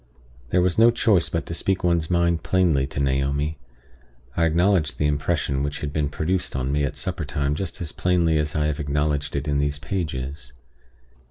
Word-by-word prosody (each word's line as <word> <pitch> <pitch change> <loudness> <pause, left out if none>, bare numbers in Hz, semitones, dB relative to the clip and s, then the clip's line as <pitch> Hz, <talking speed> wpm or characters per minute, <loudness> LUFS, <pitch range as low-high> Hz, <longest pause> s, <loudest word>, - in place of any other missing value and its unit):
There 90 +2 +3
was 90 +3 +1
no 115 +1 +8
choice 110 -6 +2
but 85 - -2
to - - -5
speak 95 +3 -1
one's 85 -3 +1
mind 85 -1 +2
plainly 85 -5 +2
to 70 - -5
Naomi. 70 +3 0 0.8
I 85 - +3
acknowledged 85 0 +2
the 75 - 0
impression 70 -2 0
which 70 0 -3
had 70 -1 -4
been 75 -2 0
produced 85 +4 -2
on 65 +1 -1
me 75 0 +1
at 70 - -2
supper 90 -3 -4
time 70 0 -1
just 85 +3 -4
as 80 -3 -3
plainly 85 -3 +2
as 75 0 -2
I 75 -1 +1
have 75 0 -1
acknowledged 75 0 -1
it 70 +1 -2
in 70 -1 +1
these 70 0 0
pages. 70 -6 -4
75 Hz, 190 wpm, -24 LUFS, 70-85 Hz, 0.8 s, no